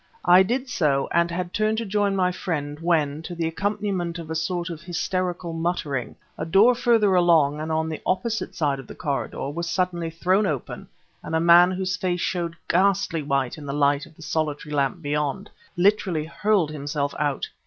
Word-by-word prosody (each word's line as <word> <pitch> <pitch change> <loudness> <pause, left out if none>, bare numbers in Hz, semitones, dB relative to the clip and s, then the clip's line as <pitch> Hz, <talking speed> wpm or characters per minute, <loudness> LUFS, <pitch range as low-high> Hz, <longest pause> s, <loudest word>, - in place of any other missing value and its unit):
I 180 +1 +7
did 250 +7 0
so 145 - +1
and 170 0 +2
had 175 +1 -4
turned 215 +1 +1
to 230 - -2
join 205 0 +1
my 180 -1 +2
friend 150 -5 -4
when, 155 -3 +1
to 175 +2 -7
the 165 -1 -1
accompaniment 185 0 -2
of 165 -1 -7
a - - 0
sort 170 +1 -2
of 165 -1 -7
hysterical 175 0 -2
muttering, 165 -6 -2 0.2
a - - -2
door 195 +9 +5
further 230 -5 +3
along, 165 -5 +4
and 160 +1 -4
on 160 0 0
the 160 -1 -5
opposite 220 +4 -1
side 145 -4 0
of 135 - -10
the - - -10
corridor, 140 -1 -3
was 170 +3 -4
suddenly 175 -2 -1
thrown 185 +5 +1
open, 145 -7 -4 0.3
and - - -4
a - - +3
man 170 +2 +7
whose 185 0 -2
face 180 -1 -1
showed 170 -3 -2
ghastly 190 -2 +2
white 140 -1 -1
in 145 - -9
the 140 - -3
light 145 0 +2
of - - -20
the 160 - -13
solitary 150 -2 -2
lamp 140 +4 0
beyond, 150 +7 -2 0.3
literally 180 -4 +2
hurled 170 0 +1
himself 145 -1 -3
out. 145 -2 -1
170 Hz, 190 wpm, -24 LUFS, 150-185 Hz, 0.3 s, I